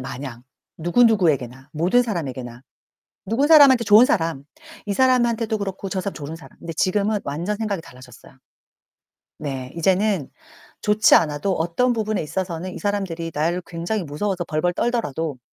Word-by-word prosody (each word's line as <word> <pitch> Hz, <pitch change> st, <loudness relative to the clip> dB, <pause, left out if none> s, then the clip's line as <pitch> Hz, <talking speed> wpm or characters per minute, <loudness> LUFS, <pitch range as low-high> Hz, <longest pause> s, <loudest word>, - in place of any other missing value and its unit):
마냥, 130 Hz, -2 st, -7 dB, 0.4 s
누구누구에게나, 160 Hz, -, +2 dB
모든 180 Hz, +11 st, +2 dB
사람에게나. 130 Hz, -, -5 dB, 0.6 s
누군 250 Hz, +9 st, +1 dB
사람한테 280 Hz, -6 st, +7 dB
좋은 215 Hz, +4 st, +7 dB
사람, 165 Hz, -, -1 dB, 0.4 s
이 205 Hz, -, -1 dB
사람한테도 235 Hz, -2 st, +2 dB
그렇고 195 Hz, -1 st, -5 dB
저 190 Hz, -, -2 dB
사람 195 Hz, +2 st, -4 dB
좋은 150 Hz, +1 st, -7 dB
사람. 165 Hz, -, -16 dB
근데 165 Hz, -, -6 dB
지금은 205 Hz, +5 st, +1 dB
완전 170 Hz, +9 st, -3 dB
생각이 205 Hz, -5 st, -3 dB
달라졌어요. 130 Hz, -2 st, -15 dB, 1.0 s
네. 135 Hz, -3 st, -5 dB
이제는 190 Hz, -2 st, +1 dB, 0.5 s
좋지 210 Hz, 0 st, +4 dB
않아도 150 Hz, +5 st, +2 dB
어떤 175 Hz, +11 st, +1 dB
부분에 215 Hz, -2 st, -1 dB
있어서는 175 Hz, +2 st, -4 dB
이 -, -, -7 dB
사람들이 190 Hz, -5 st, -3 dB
나를 170 Hz, +4 st, 0 dB
굉장히 180 Hz, +4 st, -3 dB
무서워서 175 Hz, +4 st, -3 dB
벌벌 160 Hz, +3 st, -1 dB
떨더라도 165 Hz, -, -2 dB
180 Hz, 365 characters per minute, -22 LUFS, 150-210 Hz, 1.0 s, 사람한테